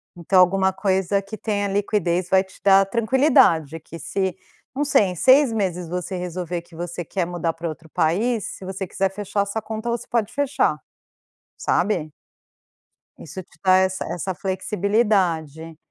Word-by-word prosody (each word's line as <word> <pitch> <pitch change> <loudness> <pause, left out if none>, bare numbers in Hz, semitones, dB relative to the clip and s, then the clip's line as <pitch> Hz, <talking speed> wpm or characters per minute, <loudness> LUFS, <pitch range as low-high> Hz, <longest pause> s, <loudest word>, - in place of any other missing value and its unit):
Então 185 +2 +2
alguma 190 +1 +4
coisa 190 0 0
que 200 +2 -9
tenha 205 -2 -1
liquidez 195 -3 0
vai 190 0 +4
te 190 -1 -18
dar 195 0 +6
tranquilidade 215 - +3
que 165 +1 -11
se, 190 +1 -2 0.4
não 285 - 0
sei, 280 -7 +4
em 185 -2 -2
6 260 - +5
meses 180 -5 -2
você 180 +2 -4
resolver 180 -1 -4
que 170 0 -18
você 175 +1 -5
quer 180 +2 -2
mudar 170 -1 -2
pra 165 0 -5
outro 160 +1 -10
país, 210 +10 +1
se 190 - -10
você 190 +1 -4
quiser 190 +2 -1
fechar 200 +1 -2
a 200 - 0
sua 210 +3 -3
conta, 220 +2 -5
você 235 0 -3
pode 225 -3 -1
fechar. 280 - +1 0.8
Sabe? 175 -6 0 1.1
Isso 185 +4 -8
te 185 - -26
dá 185 -1 +5
essa 190 0 0
essa 180 +2 -3
flexibilidade. 185 -5 -1
190 Hz, 160 wpm, -22 LUFS, 175-205 Hz, 1.1 s, dar